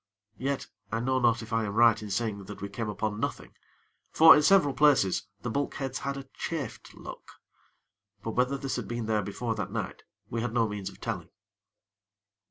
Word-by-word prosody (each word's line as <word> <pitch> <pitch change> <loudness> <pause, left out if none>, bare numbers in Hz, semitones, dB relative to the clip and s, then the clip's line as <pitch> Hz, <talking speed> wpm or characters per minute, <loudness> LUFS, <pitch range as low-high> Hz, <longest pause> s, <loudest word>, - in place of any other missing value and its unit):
Yet, 135 +1 -1 0.3
I 115 - 0
know 130 +2 +1
not 120 -1 +3
if 115 +1 -8
I 115 0 +2
am 100 0 -4
right 115 -2 +5
in 105 - -6
saying 100 -1 -2
that 105 +1 -9
we 100 0 -5
came 105 +2 -4
upon 105 0 -2
nothing; - - -4 0.6
for, 160 0 +9
in 150 - +4
several 150 -4 +5
places, 130 -8 +3 0.2
the 120 - -2
bulkheads 135 0 -2
had 140 0 -3
a 135 -1 -8
chafed 155 -8 -5
look; - - -10 0.9
but 115 - -2
whether 125 +4 +1
this 135 -1 -3
had - - -4
been 120 -1 -3
there 110 -1 +1
before 115 +3 -3
that 105 -4 -4
night, - - -4 0.3
we 115 - -3
had 120 0 -3
no 115 -2 +3
means 105 -2 -4
of - - -15
telling. - - -4
115 Hz, 190 wpm, -29 LUFS, 105-135 Hz, 0.9 s, for